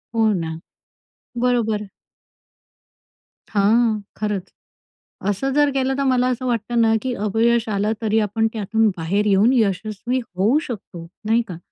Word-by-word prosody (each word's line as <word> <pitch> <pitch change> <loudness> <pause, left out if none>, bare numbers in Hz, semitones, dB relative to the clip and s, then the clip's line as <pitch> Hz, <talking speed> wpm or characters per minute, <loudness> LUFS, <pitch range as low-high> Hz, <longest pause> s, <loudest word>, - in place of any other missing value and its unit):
हो 220 -1 +3
ना, 165 -4 -2 0.9
बरोबर. 220 -4 +1 1.6
हां, 220 +2 +3 0.2
खरंच, 210 -3 -3 0.8
असं 235 +7 -1
जर 290 0 +4
केलं, 265 0 +1
तर 275 - +1
मला 255 -1 +2
असं 255 0 -2
वाटतं 235 0 0
ना, 225 -1 +4
की 255 -1 -2
अपयश 230 +2 +2
आलं 205 +1 0
तरी 220 0 +2
आपण 215 +1 0
त्यातून 220 +1 +1
बाहेर 190 +6 0
येऊन 205 +4 +4
यशस्वी 215 +2 0 0.2
होऊ 215 +10 +3
शकतो, 190 -7 -7 0.2
नाही 230 +2 +3
का? 175 -3 -7
220 Hz, 135 wpm, -21 LUFS, 205-240 Hz, 1.6 s, जर